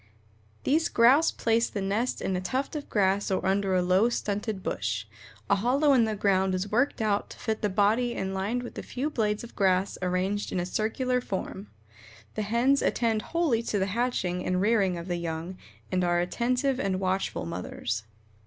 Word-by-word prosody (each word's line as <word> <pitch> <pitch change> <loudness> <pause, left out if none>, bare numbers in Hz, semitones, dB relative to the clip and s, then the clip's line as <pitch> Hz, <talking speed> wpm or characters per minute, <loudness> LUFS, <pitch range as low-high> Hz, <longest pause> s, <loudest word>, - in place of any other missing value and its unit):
These 315 +4 +2
Grouse 265 +8 +5
place 230 0 +1
the 205 - -4
nest 205 +6 -1
in 190 - 0
a 180 - -1
tuft 265 +10 -2
of 295 - -5
grass 195 -1 +1
or 190 - -1
under 195 0 +1
a 180 - +2
low, 185 +6 +3
stunted 210 -3 -3
bush. 100 +2 -2 0.4
A - - +3
hollow 275 +7 +3
in 240 -4 +5
the 220 -1 -2
ground 190 -2 +2
is 185 +2 -3
worked 245 +1 +1
out 205 -1 0
to - - -11
fit 220 -2 -2
the 210 - +1
body 220 +5 +2
and 190 0 -3
lined 210 +6 -1
with 240 - -7
a - - -3
few 280 +5 -3
blades 210 -4 0
of 235 - -11
grass 190 0 +1
arranged 185 +3 -1
in 185 - -1
a 175 - -1
circular 250 +6 0
form. 195 -2 -5 0.7
The - - -2
hens 235 +6 +2
attend 225 -2 +1
wholly 315 -5 0
to 225 -3 -2
the 190 - +1
hatching 195 -7 -1
and 180 0 0
rearing 195 -3 +2
of 170 +1 -7
the 175 -1 -1
young 170 +2 -5 0.3
and 185 -1 +1
are 175 0 +2
attentive 250 +8 0
and 190 -5 0
watchful 190 0 -1
mothers. 110 -9 -4
205 Hz, 190 wpm, -27 LUFS, 185-235 Hz, 0.7 s, Grouse